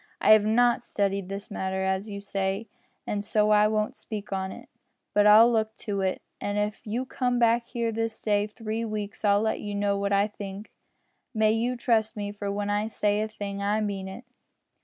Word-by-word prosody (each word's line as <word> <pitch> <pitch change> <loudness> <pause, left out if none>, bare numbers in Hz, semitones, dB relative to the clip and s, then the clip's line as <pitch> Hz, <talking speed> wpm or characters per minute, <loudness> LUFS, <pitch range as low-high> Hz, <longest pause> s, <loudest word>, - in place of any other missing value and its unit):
I - - +4
have 215 -1 +7
not 240 +2 +3
studied 200 -3 -1
this 200 +1 -6
matter, 190 -1 -2
as 190 +2 -1
you 200 -1 -6
say, 195 +2 -2 0.4
an' 205 - -2
so 210 +1 +2
I 210 0 +6
won't 215 0 -1
speak 210 -2 -6
on 190 0 -2
it. - - -11 0.5
But 205 0 +5
I'll 220 +3 +8
look 220 -1 0
into 200 -3 -3
it, 190 -1 -1 0.2
an' 205 0 -2
if 210 +1 -2
you 240 +5 -2
come 250 -1 -1
back 235 0 +3
here 235 -2 -2
this 225 0 -3
day 205 -1 +1
three 220 +1 -4
weeks 215 -2 -5
I'll 205 0 +4
let 220 0 0
you 205 -1 -5
know 200 0 +1
what 200 0 -1
I 200 +1 +3
think. 205 0 -8 0.6
You - - -3
may 225 +3 +2
trust 225 -3 +1
me, 205 -1 -3
for 205 -1 -4
when 205 0 -2
I 205 +1 0
say 210 -1 0
a 215 - -1
thing 200 -2 -6
I 205 +2 +1
mean 200 -3 -3
it." 210 +6 -9
210 Hz, 205 wpm, -27 LUFS, 200-220 Hz, 0.6 s, I'll